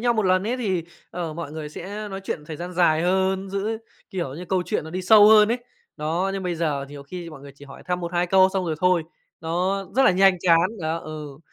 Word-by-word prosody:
nhau 240 0 +2
một 220 - +1
lần 185 0 +3
ấy, 250 +3 -1
thì, 190 -9 -1 0.3
ờ, 170 -3 -4
mọi 160 -2 -6
người 155 -1 -6
sẽ 205 +7 -7
nói 195 0 -6
chuyện 150 -5 -4
thời 155 -1 -7
gian 175 +2 -6
dài 165 -2 +3
hơn, 190 +1 0
giữ, 210 +3 -2 0.3
kiểu 170 -9 -4
như, 175 +4 -7
câu 185 0 0
chuyện - - -1
nó 160 - -8
đi 185 +2 -4
sâu 210 +2 +7
hơn 215 -1 +7
ấy, 240 +1 -2 0.3
đó, 165 +6 -1
nhưng 195 - -3
bây 180 -1 -2
giờ 150 -4 -1
nhiều 145 -1 -9
khi 170 +3 -8
mọi 155 - -11
người 140 -1 -11
chỉ 140 - -14
hỏi 135 - -12
thăm 180 0 -1
1-2 175 0 -1
câu 190 +1 +5
xong 190 -2 -1
rồi 160 -2 -1
thôi, 180 -2 +3 0.4
đó, 180 +4 -1
rất 270 - +5
là - - +6
nhanh 190 0 +4
chán. 170 +2 +4
Đó, 160 +1 -1
ừ, 150 -3 -8
180 Hz, 250 wpm, -24 LUFS, 160-195 Hz, 0.4 s, sâu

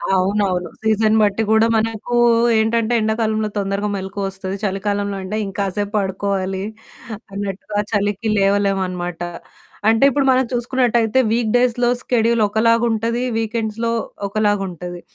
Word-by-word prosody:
అవునవును. 185 -1 0
సీజన్ 220 0 +2
బట్టి 210 +1 +2
కూడా 220 +1 +5
మనకు 225 +2 -2 0.4
ఏంటంటే, 225 +1 +1
ఎండాకాలంలో 220 0 0
తొందరగా 200 +1 -1
మెలుకువొస్తది. 195 0 -4
చలికాలంలో 200 0 -1
అంటే 210 +3 -3
ఇంకాసేపు 200 +1 -3
పడుకోవాలి 190 -1 -2 0.7
అన్నట్టుగా 200 +1 -4
చలికి 205 +1 0
లేవలేమనమాట. 195 -3 0 0.7
అంటే 225 +4 +4
ఇప్పుడు 275 +1 +1
మనం 260 0 +3
చూసుకున్నట్టయితే 240 -1 +1
వీక్ 230 -2 +1
డేస్‌లొ 245 0 +2
స్కెడూల్ 235 -2 +1
ఒకలాగుంటది. 230 +2 +1
వీకెండ్స్‌లొ 225 0 -2 0.4
ఒకలాగుంటది. 195 -4 -2
210 Hz, 105 wpm, -19 LUFS, 195-225 Hz, 0.7 s, కూడా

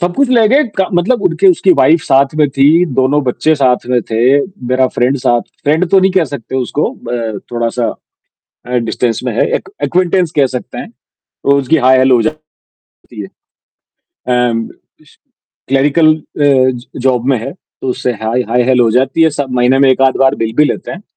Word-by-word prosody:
सब 175 0 -2
कुछ 280 -2 +1
ले 235 -4 +3
गए 285 +6 +3 0.2
क 190 - +1
मतलब 180 +9 0
उनके 385 +1 +1
उसकी 365 +1 +2
वाइफ 165 - +3
साथ 135 +2 +2
में 150 -2 +2
थी, 145 +6 +3
दोनों 135 0 0
बच्चे 155 +5 0
साथ 130 -5 0
में 125 -1 +2
थे, 125 +5 +2 0.3
मेरा 130 +1 +2
फ्रेंड 125 +3 +1
साथ 120 -1 +1 0.2
फ्रेंड 160 +5 +1
तो 195 - +5
नहीं 190 +1 +2
कह 185 -3 +2
सकते 130 -1 -6
उसको 130 +3 -2
ब 115 -4 -4
थोड़ा-सा 120 0 -2 0.8
अ, - - -8 0.2
डिस्टेंस 115 -1 -1
में - - -1
है, - - +2
एक - - -6
एक्विनेंटेंस 175 +2 0
कह 140 -2 +3
सकते 125 - -7
हैं, - - -7 0.3
तो 140 0 -1
उसकी 145 +4 +1
हाय 130 0 +5
हैलो 130 0 +4
हो 115 - +2
जाती 155 +3 -5 0.7
है। 100 - -6 1.0
एंड 120 -2 -1 0.3
इस - - -24 0.5
क्लेरिकल 145 +4 +3
अ, 155 - -15 0.2
ज 130 -3 +1
जॉब 125 -1 0
में 135 -3 +2
है, - - -6
तो 175 -6 -11
उससे 125 0 -2
हाय 115 +3 -1
हाय 125 +1 +2
हैलो 125 -2 +3
हो 115 - +2
जाती 135 +6 +1
है 160 - +4
स 145 - -5
महीने 125 +1 +2
में 135 -1 +4
1 130 - 0
आध 130 - -4
बार 135 +1 +3
मिल 110 0 -3
भी 150 - +4
लेते - - -3
हैं। 175 +4 -9
135 Hz, 200 wpm, -13 LUFS, 125-160 Hz, 1.0 s, तो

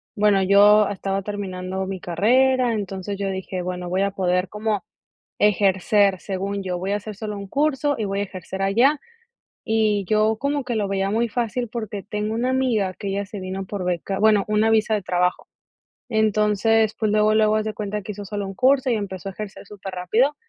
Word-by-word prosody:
bueno, 205 -2 +3
yo 205 +2 +6
estaba 195 0 -2
terminando 190 -2 -4
mi 190 -1 -4
carrera, 245 +8 +2
entonces 200 -1 -4
yo 200 -1 -2
dije: 190 -1 -4
"Bueno, 180 -1 -4
voy 190 +2 +1
a 200 - 0
poder 180 -1 0
como 210 -2 -2 0.6
ejercer", 200 -1 +3
según 195 +1 -3
yo, 180 -2 -3
"voy 190 +3 -2
a - - +2
hacer 210 +1 -7
solo 210 +1 -5
un 200 0 -7
curso 290 +3 0
y 215 - -1
voy 195 +1 -2
a - - +1
ejercer 190 0 -6
allá", 245 +10 +3 0.7
y 215 -2 +1
yo 215 0 +2
como 280 +1 -1
que 245 -1 -3
lo 210 -2 0
veía 195 0 -1
muy 230 +2 +1
fácil 240 +1 -2
porque 215 -3 -5
tengo 210 +1 -3
una 240 +3 0
amiga 230 -8 +1
que 200 - -5
ella 200 +1 -2
se 205 - -7
vino 190 0 -5
por 195 -3 -4
beca, 180 +2 -2
bueno, 215 -2 +4
una 215 +1 +2
visa 220 0 +3
de 205 - -3
trabajo. 180 0 0 0.6
Entonces, 220 0 +2
pues 215 -2 0
luego, 215 0 +3
luego 215 0 +4
haz 215 0 0
de 215 - -4
cuenta 210 0 -3
que 210 +2 -6
hizo 205 0 -8
solo 205 0 -4
un 195 - -7
curso 260 +3 +3
y 235 - +2
empezó 195 -2 -5
a - - -6
ejercer 200 0 -8
superrápido. 205 +8 -1
205 Hz, 200 wpm, -23 LUFS, 195-220 Hz, 0.7 s, yo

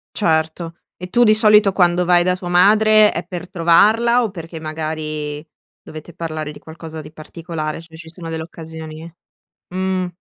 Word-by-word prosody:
Certo, 165 -2 -1 0.2
e 180 - -8
tu 240 - +3
di 215 -2 +6
solito 210 -2 +5
quando 180 -1 +2
vai 175 0 +4
da 180 - +2
tua 180 -1 -7
madre 215 +4 +5
è 170 - -4
per 180 -1 -7
trovarla 215 +9 +3
o 225 - -2
perché 165 -3 -9
magari 155 -1 -5 0.3
dovete 155 +2 -11
parlare 155 -2 -5
di 150 - -11
qualcosa 160 0 -10
di 150 0 -12
particolare? 160 0 -6
Cioè 165 - -16
se 160 - -14
ci 160 0 -12
sono 165 0 -10
delle 160 0 -4
occasioni 160 0 -10 0.6
mh. 185 0 -2
170 Hz, 170 wpm, -19 LUFS, 160-185 Hz, 0.6 s, di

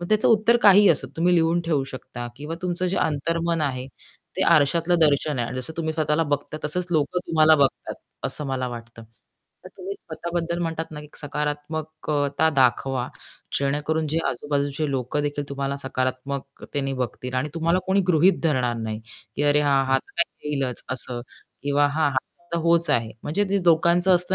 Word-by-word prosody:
मग 175 - -5
त्याचं 215 0 +3
उत्तर 225 +2 +5
काहीही 205 0 +8
असोत 150 - +1
तुम्ही 175 +2 +3
लिहून 165 +1 +3
ठेवू 150 -5 0
शकता 120 -2 -7
किंवा 150 +3 -5
तुमचं 180 0 -1
जे 180 - -1
अंतर्मन 165 +2 0
आहे 130 -3 -2 0.5
ते - - +1
आरशातलं 165 +4 +3
दर्शन 150 -2 +3
आहे 120 - -1
आणि 125 - -4
जसं 160 - -5
तुम्ही 160 -1 -1
स्वतःला 155 0 +1
बघता 145 +1 -7
तसंच 175 +4 -1
लोक 155 +1 0
तुम्हाला 160 -3 +4
बघतात 140 -2 +1 0.3
असं 150 - -2
मला 130 -1 -2
वाटतं. 115 -1 -9 0.6
तर - - -8
तुम्ही 390 +2 -6
स्वतःबद्दल 170 - -4
म्हणतात 165 -1 -2
ना 150 -1 -7
की 150 - -12
सकारात्मक 150 +2 -4
अ, 145 -1 +2
...ता 160 - +5
दाखवा 130 -2 +1 0.5
जेणेकरून, 150 +3 0
जे 160 +3 0
आजूबाजूचे 145 +2 -1
लोक 130 0 -2
देखील 145 0 -1
तुम्हाला 140 0 -3
सकारात्मकतेने 135 +1 -3
बघतील 125 +1 -5
आणि 130 +4 0
तुम्हाला 165 +2 +2
कोणी 190 +1 +3
गृहीत 175 +2 +4
धरणार 130 -7 +1
नाही. 110 -1 -4 0.4
की - - 0
अरे, 145 0 +4
हां 140 -2 +3
हा 135 0 +3
तर - - -19
काय 150 - -10
येईलच 135 -4 -1
असं 125 -1 -4 0.4
किंवा 145 0 +3
हां, 145 +1 +1
हा 130 - -5 0.4
तर - - +1
होच 170 0 +3
आहे. 115 -6 +1
म्हणजे 200 +7 0
ते 200 - +3
लोकांचं 170 +2 +4
असतं 180 0 +3
150 Hz, 175 wpm, -24 LUFS, 135-165 Hz, 0.6 s, काहीही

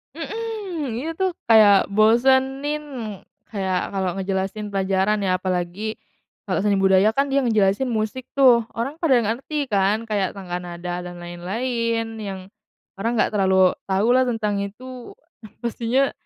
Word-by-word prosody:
Mhm, 380 - -4
ini 295 +7 -3
tuh 375 -2 0
kayak 210 -3 +5
bosenin. 265 +7 +3 0.7
Kayak 190 -3 -2
kalo 190 -2 -2
ngejelasin 195 +2 -3
pelajaran 195 +1 +1
ya, 190 -2 +1
apalagi 185 +4 -3 0.5
kalo - - 0
seni 200 -2 +2
budaya 190 +2 +4
kan 275 +1 +2
dia 275 - +3
ngejelasin 215 +1 +2
musik 220 +3 -2
tuh 250 -4 +6
orang 255 +6 -3
pada 270 -7 +4
nggak 225 0 0
ngerti 300 -2 -2
kan, 205 +1 +1
kayak 200 -4 0
tangga 180 -3 -5
nada 175 0 -5
dan 175 0 -8
lain-lain 225 +6 -3
yang 195 -3 -5 0.6
orang 230 +4 -1
nggak - - +2
terlalu 190 -2 +4
tau 195 +3 0
lah 260 - +5
tentang 215 -4 -1
itu. 250 +5 -9 0.5
Pastinya 240 +3 0
215 Hz, 140 wpm, -22 LUFS, 190-255 Hz, 0.7 s, tuh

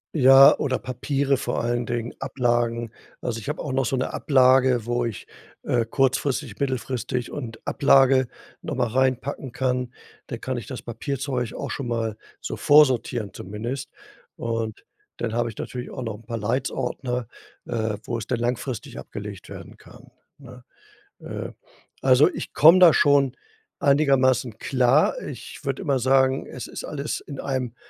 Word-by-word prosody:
Ja, 135 -1 +8
oder 130 -3 0
Papiere 135 +2 -1
vor - - -2
allen 120 0 -1
Dingen, 120 -1 -3
Ablagen. 120 -3 0 0.3
Also, 115 -2 -3
ich 115 - -7
habe 150 - -3
auch 145 - -4
noch 135 0 +1
so - - 0
'ne 130 - -2
Ablage, 130 -3 +4
wo 120 0 0
ich, 115 -4 -5 0.4
äh, 120 -2 +1
kurzfristig, 135 -1 0
mittelfristig 130 -2 -2
und 115 -6 -6
Ablage 135 -2 +4 0.3
noch - - -4
mal - - +1
reinpacken 130 +2 -1
kann. 125 -1 -1 0.4
Da 120 - -5
kann 130 +1 -4
ich 115 -3 -7
das 130 - -7
Papierzeug 125 +1 -3
auch - - -5
schon 135 -4 -4
mal 115 -2 -2 0.3
so - - -5
vorsortieren 130 -7 +3
zumindest. 115 +7 -5 0.5
Und 115 -2 -3 0.3
dann 115 -2 -3
habe 120 0 0
ich 110 - -11
natürlich 125 -1 -6
auch 130 - -6
noch 110 -2 -3
'n 110 - -15
paar 115 -1 -3
„Leitz“-Ordner, 125 +2 -2 0.4
äh, 110 -2 -2
wo 115 -1 -3
es 105 - -7
dann - - 0
langfristig 120 +1 -3
abgelegt - - -8
werden - - -10
kann, - - -17 0.3
ne? 125 -3 -13 0.6
Äh, - - -6 0.5
also, 130 +2 +6
ich - - -7
komme 165 +5 +7
da 180 -3 +9
schon 140 -3 +4 0.5
einigermaßen 135 - +3
klar. 130 - +3
Ich - - -8
würde - - -2
immer 140 -8 +1
sagen, 130 +1 +3
es 125 - -7
ist - - -7
alles 145 0 -4
in 140 -3 -9
einem 130 -3 -3
125 Hz, 155 wpm, -24 LUFS, 120-135 Hz, 0.6 s, da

